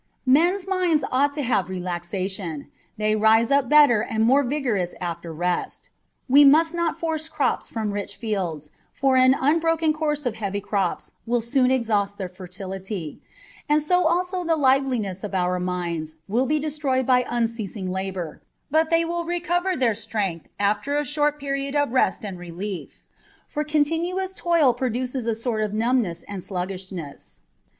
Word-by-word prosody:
Men's 345 +9 +3
minds 360 -6 +1
ought 280 +3 +3
to 295 - -2
have 195 -7 0
relaxation: 180 -2 -4 0.3
they 215 0 +1
rise 220 +2 +4
up 275 -2 +3
better 290 -7 +6
and 220 0 -1
more 265 +5 +5
vigorous 245 -10 -1
after 170 -1 -5
rest. 175 +3 -3 0.4
We 280 +3 +7
must 320 +4 +5
not 340 -1 -1
force 320 -1 -2
crops 275 -5 -1
from 220 -2 -2
rich 205 0 -4
fields, 180 -10 -3 0.2
for 270 -1 +1
an 255 +1 +6
un 295 +5 +2
broken 325 -1 +2
course 300 -2 -1
of 245 - 0
heavy 200 -2 -2
crops 200 -3 -2 0.2
will 240 +1 +2
soon 250 +3 +2
exhaust 215 -6 0
their 190 - -3
fer 185 0 -11
tility, 190 -2 -6 0.5
and 300 +1 +4
so 360 +3 +2
also 360 +2 0
the 330 -1 +2
liveliness 260 - +1
of 205 -2 -4
our 180 0 +1
minds 170 -3 -3
will 240 +6 +1
be 305 - +2
de 305 +1 -2
troyed 270 -3 0
by 250 0 +4
unceasing 225 -5 -2
labour, 190 -3 -4 0.3
but 315 +1 +3
they 330 0 +3
will 340 +1 -2
recover 350 +2 0
their 245 -4 +2
strength 205 -6 -3
after 215 +8 +1
a 295 - 0
short 295 +1 0
period 275 0 -3
of 290 -3 +1
rest 240 -5 +1
and 190 -3 -6
relief: 180 +2 -7 0.4
for 300 - -2
con 300 0 +2
tinuous 365 +5 -2
toil 335 -9 +3
produces 250 0 -2
a 230 - +1
sort 225 -1 -2
of 210 -1 -2
numbness 225 -6 0
and 200 -3 -7
sluggishness. 185 -4 -6
240 Hz, 165 wpm, -24 LUFS, 195-295 Hz, 0.5 s, We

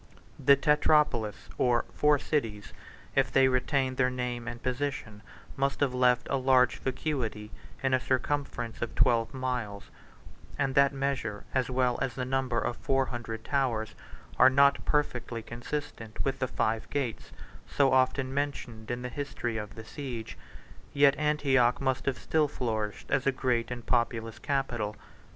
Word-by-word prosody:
The 140 - +7
Tetrapolis, 150 -7 +3 0.2
or 120 -2 +2
four 150 0 +4
cities, 115 -9 -2 0.4
if - - +2
they 135 -1 +5
retained 130 0 0
their 125 -1 +3
name 125 -1 -4
and 120 0 -6
position, 125 -5 -3 0.3
must 140 0 0
have 140 -3 +1
left 125 -1 +3
a 135 - +2
large 130 -1 +3
vacuity 125 -6 -3 0.3
in 135 -1 +2
a 130 - +4
circumference 130 -3 -2
of 120 - -3
twelve 120 -3 +3
miles; 125 -6 -4 0.7
and 135 - 0
that 140 0 +5
measure, 135 -7 -2
as 130 -1 +1
well 125 -1 +1
as 130 -3 -1
the 125 - -2
number 130 -2 -1
of 115 +2 -2
four 135 0 +1
hundred 115 -3 -6
towers, 120 -6 -1 0.5
are 130 - +9
not 140 +1 +4
perfectly 120 -6 -1
consistent 120 -2 -5
with 135 0 -1
the 130 - 0
five 110 -1 -1
gates, 130 -6 -3 0.4
so 140 -2 +2
often 130 0 +2
mentioned 130 -6 -3
in 120 0 -3
the 125 - -3
history 120 -4 -4
of 105 -4 -6
the 110 - -9
siege. 120 -4 -6 0.6
Yet 140 -1 +5
Antioch 140 -5 +2
must 130 -1 -1
have 135 -2 +1
still 155 -2 +1
flourished 110 -6 -3
as 135 -1 +1
a - - +5
great 125 -3 0
and 120 -2 -6
populous 115 -2 0
capital. 120 -6 -2
130 Hz, 155 wpm, -29 LUFS, 115-135 Hz, 0.7 s, are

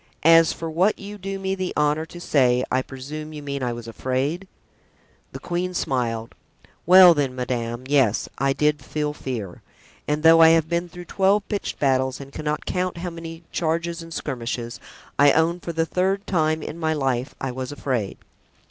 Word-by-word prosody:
As 165 0 +7
for 165 - -5
what 180 +6 +2
you 205 +1 -9
do 195 +1 -4
me 190 0 -2
the 185 -1 -3
honor 150 +2 +1
to 175 - -11
say, 125 -6 +2
I 130 - +2
presume 150 +4 -8
you 150 -1 -8
mean 140 -1 -4
I 125 -1 -1
was 120 -1 -7
afraid?" 130 - -2 0.8
The - - -7
queen 180 +1 -3
smiled. 115 -6 -2 0.5
"Well, 180 -1 +9
then, 140 -4 -1
madame, 120 -1 -3
yes, 135 -6 +2
I 135 +1 +2
did 150 0 +1
feel 150 +1 -2
fear; 115 -11 -6 0.5
and 150 +1 -1
though 165 0 +7
I 160 - +9
have 160 -1 -1
been 170 +1 -1
through 175 0 -10
twelve 200 +3 +1
pitched 205 -2 -3
battles 130 -1 +1
and 140 0 -10
I - - -17
cannot 150 -1 -3
count 185 -1 -2
how 175 +1 -4
many 165 0 -9
charges 170 +1 -1
and 165 0 -11
skirmishes, 120 -5 -4 0.4
I 145 0 +7
own 165 +2 +2
for 170 - -5
the 165 0 0
third 190 +4 0
time 155 -3 0
in 165 - -7
my 160 -1 0
life 135 -3 -1
I 135 - -3
was 130 +1 -5
afraid. 130 -8 -3
150 Hz, 185 wpm, -23 LUFS, 130-170 Hz, 0.8 s, Well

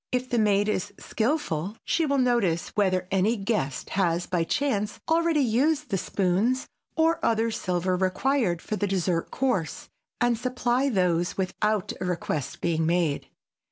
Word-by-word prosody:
If 255 0 -2
the 240 - +2
maid 205 -1 +3
is 205 -1 -2
skilful 220 - -2
she 330 -2 +1
will 280 0 +1
notice 235 -10 +1
whether 185 -3 +1
any 195 +5 +2
guest 195 - -2
has 175 -3 +1
by 175 -2 0
chance 215 - -1
already 330 -1 +3
used 280 +4 +1
the 195 - +2
spoons 200 +8 0 0.3
or 330 +1 +2
other 225 0 +2
silver 185 -3 -1
required 190 0 0
for 215 - -3
the 205 0 -1
dessert 180 -3 0
course 245 -11 -2 0.3
and 240 -2 +2
supply 255 +2 0
those 180 -5 +1
without 205 +2 -1
a - - -1
request 165 -6 -3
being 160 -2 +1
made. 170 -4 0
205 Hz, 150 wpm, -26 LUFS, 180-250 Hz, 0.3 s, maid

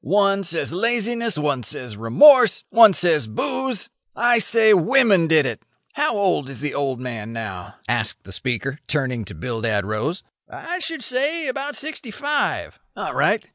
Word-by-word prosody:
One 200 +4 +2
says 165 -2 -3
laziness; 230 +1 -1
one 145 -3 -1
says 115 0 -6
remorse; 230 - +5
one 225 -3 +7
says 160 -9 +2
booze. 250 - -4 0.2
I 240 0 +3
say 220 +1 +4
women 195 -1 +4
did 155 -3 +4
it. 120 -4 -4 0.3
How 285 -6 0
old 180 -9 0
is 135 - -9
the 150 0 -3
old 135 -3 -2
man 115 -4 -6
now?" 100 -6 -7
asked - - -2
the 95 - -13
speaker, 130 +6 -3
turning 130 -6 -2
to 90 - -10
Bildad 110 +1 -2
Rose. 110 - -3 0.3
"I 350 +2 -6
should 325 -3 -5
say 285 +5 -1
about 275 +3 -4
sixty 305 -4 -6
five." 285 +6 -3 0.2
"All - - -4
right. - - +1
180 Hz, 160 wpm, -21 LUFS, -, 0.3 s, one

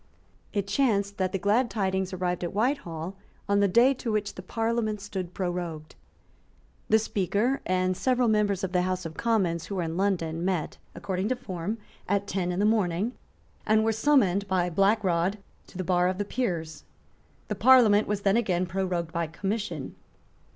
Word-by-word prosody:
It 200 -2 -1
chanced 200 -3 +1
that 185 -1 +1
the - - -1
glad 215 +6 +2
tidings 190 -2 -1
arrived 180 -1 -2
at 175 - -4
Whitehall 195 - -1 0.3
on 200 0 +3
the 200 - +4
day 240 +8 +5
to 240 -3 -4
which 210 -1 -1
the - - -8
Parliament 225 +1 -1
stood 190 -3 -6
prorogued. 175 -4 -4 1.0
The 220 - +6
Speaker 215 +5 0
and 185 0 +1
several 250 +5 +1
members 210 -3 +1
of 190 - -2
the 180 -1 +2
House 185 0 -2
of 160 - -6
Commons 185 -8 0
who 200 - -5
were 180 - -1
in 165 +1 -3
London 170 -4 0
met, 180 -4 -2 0.2
according 190 +2 -2
to 255 - +1
form, 205 -4 -4 0.3
at 200 0 +1
ten 185 -3 -2
in 175 - -3
the 205 - +2
morning, 210 -1 +1 0.5
and 215 0 +3
were 225 - +2
summoned 215 -6 +2
by 180 -2 +1
Black 200 +5 +3
Rod 180 +2 +1 0.3
to - - -12
the 185 - -2
bar 180 0 +2
of 185 0 -1
the 205 - -2
Peers. 170 -10 -3 0.6
The - - -2
Parliament 225 -5 +5
was 210 -1 -1
then 200 +2 +3
again 185 -6 +1
prorogued 180 -2 -2
by 170 -1 -1
commission. 195 -2 -4
195 Hz, 180 wpm, -27 LUFS, 180-215 Hz, 1.0 s, The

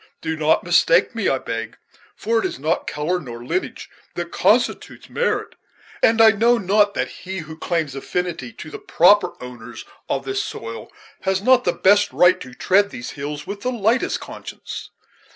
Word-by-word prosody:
Do 160 0 -3
not 155 0 +2
mistake 175 +3 +3
me, 225 -4 0
I 135 - +1
beg, 115 -3 -5 0.4
for 230 +1 0
it - - -2
is - - -3
not 155 +5 -1
color 160 +5 -1
nor 120 -6 -9
lineage 370 - -3 0.3
that - - -4
constitutes - - 0
merit; 480 - -1 0.5
and 225 0 +4
I 225 -1 +8
know 230 +3 +3
not 205 0 +2
that - - 0
he 185 0 -7
who 160 0 -9
claims 160 -3 -2
affinity 175 - -4
to - - -10
the 425 - -7
proper 210 - +4
owners 120 -1 -10 0.2
of - - -2
this 395 +1 -1
soil - - -7 0.3
has 190 0 -1
not 255 +1 +4
the - - +2
best 205 +2 +3
right 180 +1 +4
to 125 -1 -10
tread 200 +2 +3
these 120 -10 -7
hills 145 +1 -6
with 200 0 -6
the 250 - -1
lightest 230 +1 +1
conscience." - - -9
185 Hz, 175 wpm, -21 LUFS, 150-220 Hz, 0.5 s, I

